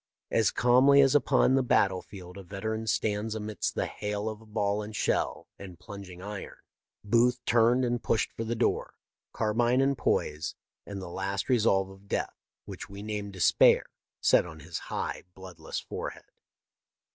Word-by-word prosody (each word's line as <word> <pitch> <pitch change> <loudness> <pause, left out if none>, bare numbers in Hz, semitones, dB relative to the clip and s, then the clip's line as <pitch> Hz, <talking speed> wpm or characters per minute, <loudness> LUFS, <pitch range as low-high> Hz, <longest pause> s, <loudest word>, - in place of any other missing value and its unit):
As 110 -3 +3
calmly 130 +3 +5
as 135 -1 +6
upon 145 -2 +4
the 135 - +4
battle 95 -7 +2
field 90 -3 -11
a 100 - -8
veteran 110 +4 -4
stands 110 0 0
amidst 105 -2 -3
the - - 0
hail 105 0 -4
of 110 0 -10
ball 105 -1 0
and 105 +1 -7
shell - - -1
and 95 -3 -10
plunging 95 0 -10
iron. 105 -1 -7 0.5
Booth 120 +4 +3
turned 120 +2 +4
and 120 0 -1
pushed 110 - 0
for 115 - -4
the 115 +1 -2
door, - - 0 0.4
carbine 120 +3 +1
in 135 +1 +3
poise, 75 - -1 0.3
and 100 -2 -6
the - - -6
last 95 +5 -3
resolve 105 -6 +3
of 95 +1 -16
death, - - -2 0.3
which - - -8
we 100 +1 -8
name 105 -1 -4
despair, 95 -4 +4 0.4
set - - +5
on 80 -3 -10
his 80 +2 -5
high, - - -3
bloodless 90 -4 -7
forehead. - - -6
105 Hz, 160 wpm, -29 LUFS, 95-115 Hz, 0.5 s, as